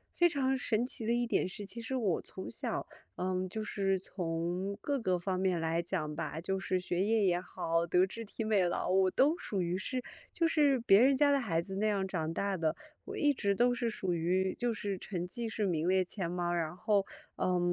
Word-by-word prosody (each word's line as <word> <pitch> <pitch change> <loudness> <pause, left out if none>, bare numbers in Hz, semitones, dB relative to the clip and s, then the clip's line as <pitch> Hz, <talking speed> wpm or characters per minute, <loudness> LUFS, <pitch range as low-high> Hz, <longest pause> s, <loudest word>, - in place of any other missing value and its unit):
非 345 - +5
常 270 -4 +1
神 230 -2 0
奇 245 -3 -5
的 235 - +2
一 240 0 +1
点 185 - +1
是， 205 +2 -7
其 205 +4 -7
实 245 +3 -3
我 205 -9 +1
从 190 - -8
小， - - -3 0.3
呃， 185 0 -1
就 215 +3 -4
是 195 -2 0
从 180 +2 -3
各 280 -2 -1
个 185 -5 +1
方 185 +1 -1
面 185 -3 +1
来 165 +1 0
讲 165 -4 -2
吧， 160 0 -4
就 190 +2 -1
是 185 -1 0
学 180 +1 -1
业 220 0 +2
也 175 -1 +3
好， 165 -2 -1
德 180 +2 +4
智 230 +3 -7
体 220 - -5
美 210 -4 +3
劳 175 - -1
我 190 0 +4
都 300 +6 +3
属 200 - -2
于 175 +1 -1
是 255 +6 -3 0.3
就 335 -1 +2
是 290 -5 +3
别 205 -3 +6
人 265 +2 +5
家 285 +1 +4
的 280 - +4
孩 170 -9 0
子 190 +2 -7
那 210 +2 0
样 195 -2 +1
长 165 -3 -2
大 200 +1 -1
的。 160 -2 0 0.3
我 - - -6
一 290 -1 +3
直 200 -7 +1
都 245 +4 +3
是 235 -1 -1
属 190 -5 -1
于 185 +3 +1
就 240 -1 +1
是 200 -2 -3
成 180 -2 -4
绩 235 +4 -4
是 215 -2 -1
名 165 -1 0
列 185 0 +4
前 180 -2 -4
茅， 175 -1 -1
然 170 -1 -1
后， 200 0 +2 0.3
呃， 180 -1 +1
190 Hz, 245 characters per minute, -32 LUFS, 180-230 Hz, 0.3 s, 别